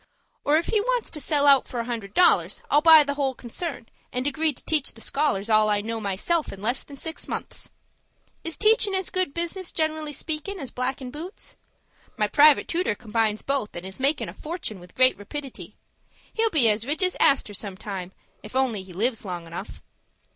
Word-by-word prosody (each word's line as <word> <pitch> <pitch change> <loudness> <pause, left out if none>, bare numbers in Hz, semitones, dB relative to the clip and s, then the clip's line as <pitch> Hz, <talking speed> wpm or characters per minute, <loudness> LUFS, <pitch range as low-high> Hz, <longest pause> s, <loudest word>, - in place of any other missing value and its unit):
Or, 295 +2 +4
if 335 - 0
he 435 -2 +2
wants - - -1
to 300 - -4
sell 290 -1 +2
out 275 -2 +6
for 245 - -5
a 230 - -2
hundred 225 -5 -5
dollars, 360 - +3
I'll 295 - +5
buy 320 -1 +9
the 285 0 -2
whole 275 -2 -1
concern, 245 +1 -6 0.2
and 250 +1 -2
agree 310 +2 +1
to 275 - -14
teach 305 -3 +1
the - - -15
scholars 225 -6 -1
all 215 -1 +4
I 205 -1 +2
know 225 +2 -4
myself 215 - -1
in 195 - -9
less 240 +6 -1
than 280 - -12
six 320 +4 -4
months. - - -6 0.7
Is 330 - -4
teachin' 430 -2 +4
as 380 -1 -1
good 370 -5 +1
business, 345 +3 -3
generally 315 -1 -1
speakin', 315 +6 -4
as 270 - -7
blackin' 255 0 -3
boots? 335 +7 -8 0.6
My 210 -2 +2
private 295 +5 +5
tooter 340 - 0
combines 220 -1 -1
both, 275 -6 -2
and 175 +1 -6
is 190 +4 -7
makin' 280 +3 +1
a - - -7
fortun' 310 - -6
with 180 0 -16
great 255 0 +5
rapidity. 270 +6 -7 0.6
He'll 455 0 +2
be 300 - +3
as 215 +2 +1
rich 305 +5 -1
as 365 - +2
Astor 265 -6 +3
some 200 -2 -5
time, 190 -3 -6 0.3
_if 210 - -10
he - - 0
only 240 -7 0
lives 210 +6 -1
long 175 -4 -5
enough. 170 +5 -8
275 Hz, 200 wpm, -25 LUFS, 215-315 Hz, 0.7 s, buy